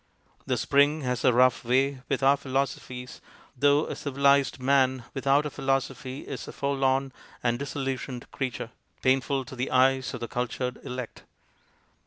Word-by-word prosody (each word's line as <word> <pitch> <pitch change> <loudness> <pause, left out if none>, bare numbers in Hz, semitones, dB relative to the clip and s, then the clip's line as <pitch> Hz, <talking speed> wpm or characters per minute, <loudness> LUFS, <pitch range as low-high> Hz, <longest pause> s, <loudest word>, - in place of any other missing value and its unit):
The - - +1
spring 145 +2 +3
has 125 -2 -2
a - - +6
rough 125 +1 +4
way 130 +2 +1
with 140 0 0
our 135 +1 +6
philoso 135 0 -1
phies, 125 0 -9 0.3
though 145 +3 +3
a - - -5
civilized 140 -1 +2
man 130 -1 +2
without 140 +1 +2
a 150 - -3
philosophy 135 0 -2
is 135 - -7
a - - -6
forlorn 135 -1 0 0.3
and 120 0 +1
disillusioned 135 -2 -4
creature, 125 -3 -4 0.3
painful 135 +1 +2
to 130 - -9
the 125 +1 -2
eyes 130 0 +3
of - - -6
the 120 - -3
cultured 125 +1 -3
elect. 125 -2 -6
135 Hz, 155 wpm, -27 LUFS, 125-140 Hz, 0.3 s, a